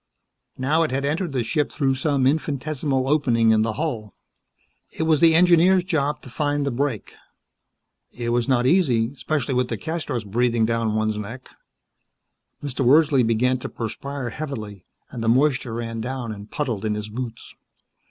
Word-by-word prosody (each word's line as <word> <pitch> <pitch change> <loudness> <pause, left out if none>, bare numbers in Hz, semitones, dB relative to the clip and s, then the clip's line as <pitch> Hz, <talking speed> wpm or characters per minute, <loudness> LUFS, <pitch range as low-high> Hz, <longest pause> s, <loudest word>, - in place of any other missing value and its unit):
Now 145 +5 +1
it 160 - +1
had 135 +2 -1
entered 160 +4 -1
the 130 -3 -1
ship 150 +5 -1
through 135 -3 +1
some 135 0 0
infinitesimal 140 -2 0
opening 120 -6 +3
in 110 -1 +4
the 110 0 0
hull. 115 -7 -4 0.7
It - - -4
was 160 -2 +3
the 165 0 +5
engineer's 180 +2 +5
job 155 -5 -1
to - - -10
find 145 +1 -1
that 140 - 0
break. 130 -3 -2 1.0
It 120 -1 -4
was 120 +1 +1
not 125 -2 +2
easy, 130 -8 +3
especially 140 -1 -2
with 125 0 +1
DeCastros 125 - -3
breathing 115 +2 +1
down 115 -1 0
one's 110 -1 0
neck. 115 +5 -8 1.1
Mr. 135 -1 -2
Wordsley 140 +1 +5
began 120 +2 +1
to - - -6
perspire 125 +3 -5
heavily, 110 - -6 0.3
and 115 - -5
the 115 - +1
moisture 125 -2 +2
ran 115 -1 -4
down 125 -1 -4
and 105 0 -9
puddled 120 -9 -3
in 105 -1 0
his 105 0 -5
boots. 115 +1 -7
130 Hz, 160 wpm, -23 LUFS, 115-145 Hz, 1.1 s, the